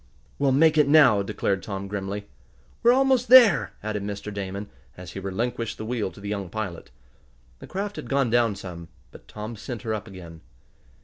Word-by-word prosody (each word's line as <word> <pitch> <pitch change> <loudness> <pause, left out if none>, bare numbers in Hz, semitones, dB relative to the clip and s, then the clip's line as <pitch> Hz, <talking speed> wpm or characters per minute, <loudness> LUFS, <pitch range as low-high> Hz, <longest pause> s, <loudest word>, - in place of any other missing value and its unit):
"We'll 140 -1 +3
make 155 +3 +4
it 150 - +5
now!" 140 -9 +6
declared 100 0 -2
Tom 100 -1 -5
grimly. 100 0 -4 0.6
"We're 235 - +6
almost 260 -1 +3
there," 215 - +7
added 105 -1 -3
Mr. 100 +1 -5
Damon, 100 +1 -5 0.3
as 90 -1 -9
he - - -6
relinquished 115 +4 -3
the 110 - -6
wheel 115 -3 -2
to - - -15
the 100 0 -6
young 100 -3 -3
pilot. 100 -4 -5 0.7
The - - -11
craft 200 +2 -4
had - - -7
gone 135 -4 +1
down 115 -3 +2
some, 90 -4 -9 0.2
but - - -15
Tom 110 +2 -7
sent 115 +1 -7
her 110 - -2
up 105 0 -5
again. 85 -5 -11
105 Hz, 185 wpm, -25 LUFS, 100-135 Hz, 0.7 s, there